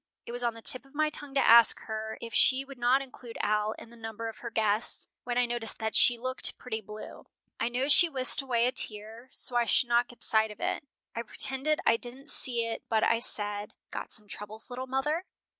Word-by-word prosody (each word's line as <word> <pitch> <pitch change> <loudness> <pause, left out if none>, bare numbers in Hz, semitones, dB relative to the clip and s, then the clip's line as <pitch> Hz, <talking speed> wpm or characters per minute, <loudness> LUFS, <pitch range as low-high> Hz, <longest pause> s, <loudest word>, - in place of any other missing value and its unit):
It - - -8
was 245 0 -3
on 235 -1 -1
the 230 - -13
tip 255 - +6
of 275 +1 -22
my 310 0 +1
tongue 285 -2 -7
to 275 - +2
ask 230 -1 +7
her 220 0 -6
if 230 0 -8
she 265 +1 +2
would 275 -2 -12
not 250 +3 +2
include 250 -3 -12
Al 210 +1 0
in 230 - -14
the - - -15
number 225 0 -6
of 225 - -12
her 235 - -6
guests, 220 0 -1 0.2
when 245 0 -2
I 245 - +3
noticed 235 -2 +1
that 220 -1 -3
she 245 - +5
looked 255 +2 +1
pretty 225 -3 -5
blue. 210 +1 -11 0.3
I 230 - 0
know 250 +3 -1
she 335 +4 +5
whisked 260 -1 +1
away 240 -3 0
a 250 - +1
tear 225 +1 0
so 245 - +1
I 240 0 +3
should 240 +2 +1
not 240 0 +2
get 245 - -8
sight 220 0 +2
of 210 - -12
it. - - -2 0.3
I 230 - -2
pretended 270 +6 0
I 230 - +4
didn't 255 +5 0
see 235 -3 +1
it 230 0 -5
but 220 -1 +1
I 230 - +2
said, 205 -3 -1 0.2
'Got - - -6
some 210 -2 -1
troubles, 215 +4 -9
little 255 +1 -6
mother?'" 295 +6 -1
235 Hz, 230 wpm, -28 LUFS, 220-260 Hz, 0.3 s, ask